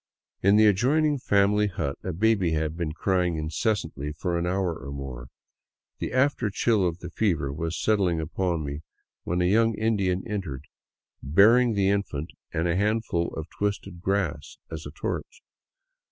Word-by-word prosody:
In 100 +2 +5
the 110 +1 +6
adjoining 140 +9 +3
family 105 -4 +3
hut 70 -7 -3
a 95 - -2
baby 95 -2 +2
had 80 0 -1
been 85 -3 -2
crying 90 0 0
incessantly 80 -2 -2
for 85 +3 -2
an 85 +1 0
hour 90 -1 0
or 70 -2 -8
more. 65 -3 -7 0.7
The - - -2
afterchill 115 -6 +2
of 85 -1 -3
the 85 - -7
fever 80 -10 0
was 80 +3 -3
settling 95 -6 +2
upon 85 0 -1
me 70 +1 -4 0.5
when 90 +1 0
a - - +2
young 115 +4 +3
Indian 100 -4 0
entered, 95 -11 -4 0.6
bearing 110 - +5
the 100 -1 +2
infant, 85 -6 -2 0.2
and 80 +2 0
a 85 - +1
handful 105 -4 0
of 80 0 -5
twisted 100 -4 -3
grass 95 -7 -2
as 80 -2 -6
torch. 485 0 -5
90 Hz, 155 wpm, -26 LUFS, 80-105 Hz, 0.7 s, the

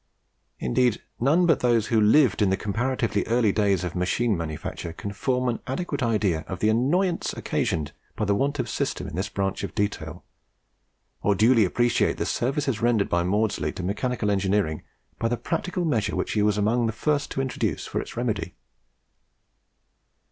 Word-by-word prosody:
Indeed 115 - +1 0.2
none 155 +9 +3
but 165 -5 +3
those 115 -3 +2
who 110 - +5
lived 115 +2 +4
in 100 - +4
the 95 - +1
comparatively 115 +1 -1
early 115 -2 +3
days 100 -3 +1
of 90 - -3
machine 100 +5 +1
manufacture 80 0 -5
can 100 +4 -6
form 125 +4 0
an 120 -2 -1
adequate 145 +5 -3
idea 105 -9 +1
of 95 - -4
the 105 +3 +2
annoyance 165 - +1
occasioned 75 -3 -2 0.2
by 110 - -1
the 100 - +2
want 140 +7 0
of - - -2
system 135 -9 -2
in 85 - -7
this 95 +4 -2
branch 95 -1 -2
of - - -5
detail, 90 -5 -3 1.0
or 100 - +2
duly 115 +2 +5
appreciate 120 +6 +1
the - - -1
services 135 -2 -1
rendered 115 -4 +2
by 85 - +2
Maudslay 105 +4 0
to 90 - -6
mechanical 105 +3 -1
engineering 95 -5 0 0.4
by 115 - +1
the 120 +1 -1
practical 180 - -2
measures 115 -10 0
which - - -2
he 105 - +1
was 105 0 +2
among 115 +3 +2
the 110 - -2
first 145 +5 0
to - - -4
introduce 115 - -2
for - - -2
its - - -10
remedy. 110 -6 -2
110 Hz, 175 wpm, -25 LUFS, 100-125 Hz, 1.0 s, who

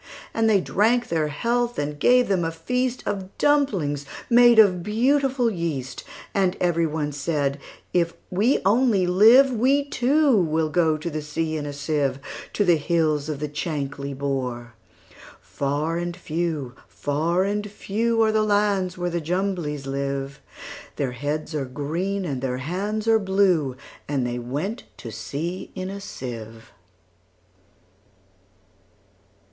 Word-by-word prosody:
And 225 0 +2
they 205 -2 +5
drank 230 +7 +1
their 160 -2 +1
health, 235 +10 -1
and 145 0 -3
gave 250 +6 +4
them 190 -3 +1
a 165 - 0
feastOf 205 +2 -2
dumplings 200 - +1 0.3
made 240 0 +7
of 195 -5 +6
beautiful 255 +4 +2
yeast; 160 - -4 0.3
And 190 -2 +1
every 170 -2 +2
one 150 -1 -2
said, 145 -1 -1 0.3
"If 170 -1 +1 0.2
we 210 +9 +2
only 215 -2 +3
live, 225 +9 +6
We, 265 +4 +2
too, 280 +1 +3
will 160 -4 +1
go 160 -2 +2
to 155 0 -4
sea 155 +2 -2
in 150 -1 -3
a - - -4
sieve, 145 -1 -1 0.4
To 205 - +1
the 175 -3 +5
hills 155 -1 0
of 150 -2 -3
the 150 - -2
Chankly 140 -2 -4
Bore."Far 135 +3 -4
and 175 0 -4
few, 160 -6 -3
far 160 +6 0
and 205 +1 -2
few, 225 +3 0
Are 220 - +3
the 215 0 +2
lands 205 -3 +1
where 175 0 -2
the 170 0 -1
Jumblies 170 -4 -2
live:Their 140 0 -5
heads 150 +5 -3
are 145 -3 -1
green, 170 +9 -3
and 135 -6 -3
their 130 -1 -2
hands 200 - -3
are 225 -1 +5
blue; 190 -9 +2 0.3
And 135 -4 0
they 120 0 -2
went 145 - -4
to 115 - -8
sea 145 - -5
in 185 +1 -4
a 200 0 -7
sieve. 115 - -8
170 Hz, 135 wpm, -24 LUFS, 145-205 Hz, 0.4 s, made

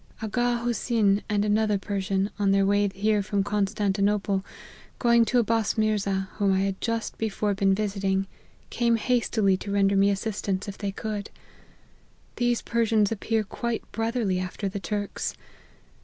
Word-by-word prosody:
Aga 240 +2 0
Hosyn 220 -3 +1
and 205 -1 +1
another 210 0 +2
Persian, 195 0 -1
on 200 -1 +2
their 195 0 +4
way 205 +1 +2
here 210 +2 +1
from 200 0 0
Constantinople, 200 -1 0 0.5
going 235 -1 +4
to 245 - +1
Abbas 225 -2 +1
Mirza, 200 -3 0
whom 200 -1 +2
I 190 - +2
had 195 -1 -2
just 230 -1 -2
before 210 -1 0
been 195 0 +2
visiting, 195 -2 0 0.5
came 235 -1 +2
hastily 225 -5 +1
to 200 - -6
render 200 0 +3
me 195 +1 +4
assistance 200 -1 -2
if 200 - -5
they 200 -2 -2
could. 210 0 -4 1.1
These 240 -1 +1
Persians 225 -3 +2
appear 220 0 0
quite 230 +3 -3
bro 225 0 -1
therly 215 -7 0
after 185 +2 -4
the 195 +1 -4
Turks. 205 +2 -3
205 Hz, 150 wpm, -26 LUFS, 195-225 Hz, 1.1 s, their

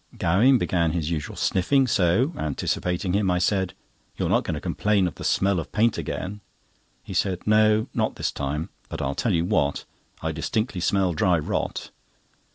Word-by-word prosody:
Gowing 115 +11 +4
began 85 -7 0
his 85 -2 -2
usual 75 -3 -3
sniffing, 135 +9 +2
so, 110 - +2
anticipating 90 - -2
him, 100 -1 +2
I 90 - +2
said: 95 0 0 0.4
"You're - - -1
not - - +3
going - - -3
to - - -4
complain 105 -3 +1
of 85 - -4
the - - -10
smell 95 -2 +2
of 80 - -7
paint 115 +2 +2
again?" 100 +3 -5 0.6
He - - -8
said: 90 -2 -1
"No, 110 0 +4
not - - 0
this - - -2
time; 75 +3 -3 0.2
but - - -5
I'll 70 - -1
tell 115 - -1
you 85 0 +1
what, 75 -8 0 0.4
I 80 - 0
distinctly 95 +5 -2
smell 95 -1 +1
dry 90 +2 +2
rot." 75 - -3
90 Hz, 175 wpm, -24 LUFS, 85-105 Hz, 0.6 s, Gowing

